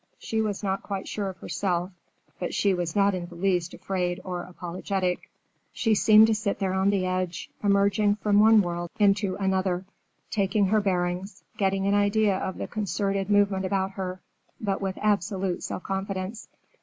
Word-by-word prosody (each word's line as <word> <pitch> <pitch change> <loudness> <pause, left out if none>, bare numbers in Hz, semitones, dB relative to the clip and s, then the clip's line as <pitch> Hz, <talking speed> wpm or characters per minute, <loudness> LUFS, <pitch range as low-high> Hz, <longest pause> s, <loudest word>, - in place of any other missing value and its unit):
She 220 0 -2
was 210 -2 -2
not 195 -1 -1
quite 195 -2 -5
sure 200 -2 -3
of 185 - -9
herself, 180 -1 -2 0.5
but - - -3
she 200 -2 +3
was 175 -3 -2
not 200 0 +4
in 175 -2 -4
the 175 - -12
least 180 -1 0
afraid 180 -2 -2
or 180 -2 -4
apologetic. 180 +1 -3 0.4
She 225 - +1
seemed 215 +1 +7
to 225 - +2
sit 210 -2 -1
there 190 -2 -1
on 190 +1 +2
the 195 -2 +1
edge, 185 -1 -2
emerging 200 +1 +3
from 210 -1 +2
one 215 0 +7
world 175 -1 -3
into 200 -2 +3
another, 190 -1 0 0.5
taking 200 0 +2
her 215 +1 +3
bearings, 180 0 -2
getting 195 -1 0
an 200 - +2
idea 205 0 +3
of 190 - -4
the - - -3
concerted 195 -1 -2
movement 200 -2 +3
about 190 0 0
her, 185 -1 -5 0.4
but 200 -3 -2
with 190 -1 -2
absolute 195 -2 0
self - - -5
confidence. 195 +2 -4
195 Hz, 170 wpm, -26 LUFS, 185-205 Hz, 0.5 s, seemed